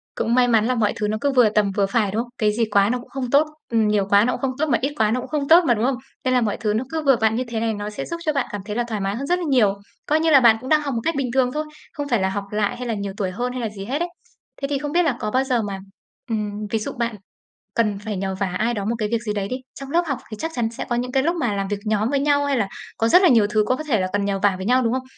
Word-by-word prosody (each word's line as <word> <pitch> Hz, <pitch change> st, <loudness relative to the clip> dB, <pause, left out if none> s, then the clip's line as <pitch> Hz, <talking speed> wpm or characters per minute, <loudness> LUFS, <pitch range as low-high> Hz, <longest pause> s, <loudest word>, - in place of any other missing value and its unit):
Cũng 230 Hz, -, 0 dB
may 250 Hz, -1 st, +4 dB
mắn 225 Hz, -3 st, +3 dB
là 255 Hz, +2 st, +1 dB
mọi 215 Hz, -3 st, +1 dB
thứ 210 Hz, -, -1 dB
nó 215 Hz, +1 st, -1 dB
cứ 285 Hz, -, +2 dB
vừa 250 Hz, -5 st, +5 dB
tầm 210 Hz, -2 st, +1 dB
vừa 200 Hz, +1 st, +1 dB
phải, 205 Hz, 0 st, 0 dB
đúng 220 Hz, +3 st, 0 dB
không? 245 Hz, -, -15 dB
Cái 215 Hz, -1 st, +2 dB
gì 230 Hz, +1 st, +1 dB
quá 200 Hz, 0 st, +4 dB
nó 250 Hz, +1 st, 0 dB
cũng 245 Hz, -, -14 dB
không 265 Hz, -3 st, -4 dB
tốt, 285 Hz, +4 st, +4 dB, 0.2 s
ừm, 225 Hz, -2 st, +2 dB
nhiều 205 Hz, -2 st, +1 dB
quá 205 Hz, +2 st, +5 dB
nó 250 Hz, -, +1 dB
cũng -, -, -5 dB
không 265 Hz, -2 st, -1 dB
tốt 310 Hz, -, +2 dB
mà 240 Hz, -, +3 dB
ít 275 Hz, +3 st, -1 dB
quá 215 Hz, -4 st, +2 dB
nó 250 Hz, -, +1 dB
cũng -, -, -9 dB
không 295 Hz, -2 st, -1 dB
tốt 335 Hz, +4 st, +7 dB
mà, 240 Hz, -, +5 dB
đúng 225 Hz, +1 st, 0 dB
không? 265 Hz, +1 st, +1 dB, 0.3 s
Nên 255 Hz, -, +1 dB
là 250 Hz, -, +3 dB
mọi 210 Hz, -3 st, -1 dB
thứ 210 Hz, -2 st, -1 dB
nó 220 Hz, +4 st, 0 dB
cứ 320 Hz, +1 st, -2 dB
vừa 275 Hz, -2 st, +5 dB
vặn 220 Hz, 0 st, +3 dB
như 250 Hz, -, 0 dB
thế 230 Hz, -1 st, -3 dB
này, 225 Hz, 0 st, 0 dB
nó 205 Hz, 0 st, -4 dB
sẽ 210 Hz, -, -5 dB
giúp 335 Hz, -, -4 dB
cho 305 Hz, -, +1 dB
bạn 275 Hz, -3 st, 0 dB
cảm 205 Hz, -, -4 dB
thấy 210 Hz, -1 st, -5 dB
là 240 Hz, -, +1 dB
thoải 215 Hz, -3 st, -3 dB
mái 195 Hz, +1 st, -1 dB
hơn 275 Hz, +4 st, -4 dB
rất 355 Hz, +2 st, +1 dB
là 350 Hz, -, -3 dB
nhiều, 230 Hz, -7 st, +4 dB, 0.3 s
coi 305 Hz, +1 st, +2 dB
như 325 Hz, +1 st, +2 dB
là 285 Hz, -3 st, +7 dB
bạn 235 Hz, -3 st, +6 dB
cũng 260 Hz, -, -7 dB
đang 305 Hz, -1 st, +4 dB
học 280 Hz, -2 st, -3 dB
một 230 Hz, -, -2 dB
cách 330 Hz, -, 0 dB
bình 275 Hz, -2 st, -1 dB
thường 255 Hz, -1 st, +2 dB
thôi, 305 Hz, -, -1 dB, 0.3 s
không 290 Hz, -1 st, -4 dB
phải 235 Hz, -6 st, +2 dB
là 190 Hz, -, +1 dB
học 200 Hz, +1 st, -3 dB
lại 210 Hz, -1 st, -1 dB
hay 250 Hz, 0 st, -5 dB
là 230 Hz, -, -1 dB
nhiều 200 Hz, -2 st, -4 dB
tuổi 190 Hz, -3 st, -1 dB
hơn 245 Hz, +6 st, -3 dB
hay 255 Hz, -, -4 dB
là 225 Hz, -, -2 dB
gì 200 Hz, -2 st, -8 dB
hết 270 Hz, +7 st, -2 dB
ấy. 345 Hz, +1 st, -1 dB, 0.5 s
Thế 275 Hz, -, -1 dB
thì 280 Hz, 0 st, -1 dB
không 290 Hz, 0 st, -4 dB
biết 350 Hz, +3 st, +3 dB
là 280 Hz, -8 st, 0 dB
có 210 Hz, -, -3 dB
bao 260 Hz, +3 st, +2 dB
giờ 255 Hz, -3 st, +1 dB
mà, 200 Hz, -2 st, -4 dB, 0.5 s
ừm, 210 Hz, -1 st, -3 dB
ví 225 Hz, -, 0 dB
dụ 215 Hz, -, -4 dB
bạn 235 Hz, -2 st, -2 dB, 0.6 s
cần 210 Hz, -3 st, +1 dB
phải 210 Hz, 0 st, -5 dB
nhờ 190 Hz, 0 st, -2 dB
vả 195 Hz, +1 st, -1 dB
ai 235 Hz, +2 st, +1 dB
đó 205 Hz, -3 st, -3 dB
một 225 Hz, +3 st, 0 dB
cái 215 Hz, -2 st, -1 dB
việc 230 Hz, -, +2 dB
gì 215 Hz, -3 st, -2 dB
đấy 200 Hz, -1 st, -2 dB
đi, 255 Hz, -, -2 dB, 0.2 s
trong 275 Hz, 0 st, -9 dB
lớp 340 Hz, +4 st, +3 dB
học 275 Hz, -5 st, -2 dB
thì 215 Hz, -, -6 dB
chắc 325 Hz, -, -2 dB
chắn 230 Hz, -2 st, -1 dB
sẽ 230 Hz, -, -6 dB
có 240 Hz, -, 0 dB
những 250 Hz, +1 st, -3 dB
cái 265 Hz, -, +2 dB
lúc 335 Hz, +4 st, 0 dB
mà 240 Hz, -10 st, 0 dB
làm 195 Hz, -1 st, -2 dB
việc 205 Hz, 0 st, -2 dB
nhóm 215 Hz, +1 st, 0 dB
với 280 Hz, -1 st, +1 dB
nhau 285 Hz, 0 st, +2 dB
hay 280 Hz, -1 st, +1 dB
là 210 Hz, -5 st, 0 dB, 0.3 s
có 225 Hz, -, +1 dB
rất 360 Hz, +10 st, +6 dB
là 365 Hz, -, +6 dB
nhiều 230 Hz, -7 st, +5 dB
thứ 215 Hz, 0 st, +3 dB
có 255 Hz, -, +1 dB
có 310 Hz, -, -6 dB
thể 245 Hz, -9 st, +1 dB
là 185 Hz, -, 0 dB
cần 205 Hz, -1 st, 0 dB
nhờ 200 Hz, -1 st, -1 dB
vả 205 Hz, -2 st, +4 dB
với 190 Hz, +1 st, -6 dB
nhau, 255 Hz, +2 st, +3 dB
đúng 230 Hz, -1 st, +1 dB
không? 260 Hz, 0 st, -1 dB
235 Hz, 360 wpm, -22 LUFS, 210-270 Hz, 0.6 s, tốt